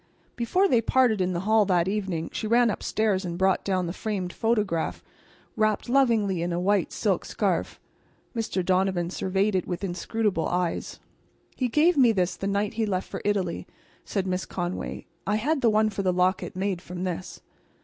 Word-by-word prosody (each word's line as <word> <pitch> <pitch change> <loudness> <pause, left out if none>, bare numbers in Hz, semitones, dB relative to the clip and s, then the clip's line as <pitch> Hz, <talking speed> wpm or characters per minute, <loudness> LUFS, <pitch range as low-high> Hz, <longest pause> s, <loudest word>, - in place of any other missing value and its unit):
Before 360 +12 +2
they 240 -10 +3
parted 230 -3 +3
in 185 0 0
the 170 - -2
hall 215 +2 +4
that 180 -2 +2
evening 190 -5 -2
she 220 - -3
ran 235 +1 +4
upstairs 210 -2 0
and 170 -1 -4
brought 190 0 +2
down 185 -2 0
the 170 - -3
framed 190 -4 -3
photograph 210 -8 0 0.5
wrapped 215 0 +1
lovingly 230 -8 +2
in 175 +1 -1
a 170 - -1
white 200 +3 +1
silk - - 0
scarf. - - -1 0.6
Mr. 215 -5 -1
Donovan 185 -2 +1
surveyed 195 +3 0
it 185 -2 0
with 180 +1 -4
inscrutable 195 0 -1
eyes. 175 -1 -2 0.6
"He 255 - 0
gave 305 +7 +3
me 250 -4 +6
this 180 -3 0
the 195 - -4
night 200 +1 0
he 220 -1 -1
left 185 -2 -1
for - - -6
Italy," 205 -2 -1 0.4
said 195 -3 -2
Miss 185 0 -2
Conway. 175 0 -4 0.2
"I 210 - +2
had 280 +7 0
the 235 - +4
one 215 0 +3
for 200 - -3
the 185 -1 +2
locket 180 +1 0
made 190 -1 -1
from 180 0 -6
this." 180 0 -5
195 Hz, 180 wpm, -26 LUFS, 180-220 Hz, 0.6 s, me